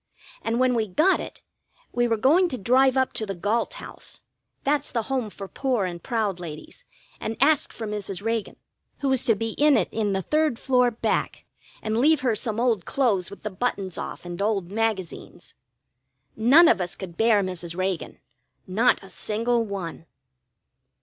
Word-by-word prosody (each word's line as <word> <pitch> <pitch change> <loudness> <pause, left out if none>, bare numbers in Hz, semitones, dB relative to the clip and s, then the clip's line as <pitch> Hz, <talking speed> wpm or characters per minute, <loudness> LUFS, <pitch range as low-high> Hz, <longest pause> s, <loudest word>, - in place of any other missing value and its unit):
And 230 +2 -1
when 255 0 +3
we 225 -2 0
got 310 - +3
it, - - -8 0.5
we 240 0 +1
were 225 -1 +1
going 320 - +4
to 255 - -4
drive 260 +5 +3
up 260 0 +1
to - - -1
the 195 - -3
Galt 215 - -1
House - - -9 0.4
that's 290 +1 0
the 230 -2 -1
Home 255 -3 -2
for 195 -1 -8
Poor 250 -3 -1
and 175 -2 -5
Proud 215 -7 -1
Ladies 160 -3 -9 0.3
and 220 +1 -4
ask 290 +1 +3
for 225 - -6
Mrs. 205 -3 -4
Reagan, 225 -1 -2 0.5
who 275 - +1
was 265 -2 +2
to 225 - +4
be 225 +2 -3
in 295 -1 +5
it - - +1
in 210 -3 0
the 190 0 -1
third 305 - +1
floor 250 -1 +3
back, 230 - -2 0.4
and 220 +1 0
leave 305 +3 +4
her 245 -4 +1
some 215 +1 -1
old 230 -6 +2
clothes 205 -6 +1
with 200 - -12
the 215 - -3
buttons 195 -3 -2
off, - - -6
and 175 +1 -6
old 200 -4 0
magazines. 210 -6 -3 0.8
None 270 +10 +7
of - - +4
us 180 -1 -2
could 180 -4 -8
bear 220 -1 +3
Mrs. 175 -2 -5
Reagan 185 -2 -2 0.5
not 210 +5 +2
a - - -11
single 230 +4 0
one. 185 -6 -6
225 Hz, 180 wpm, -25 LUFS, 195-250 Hz, 0.8 s, None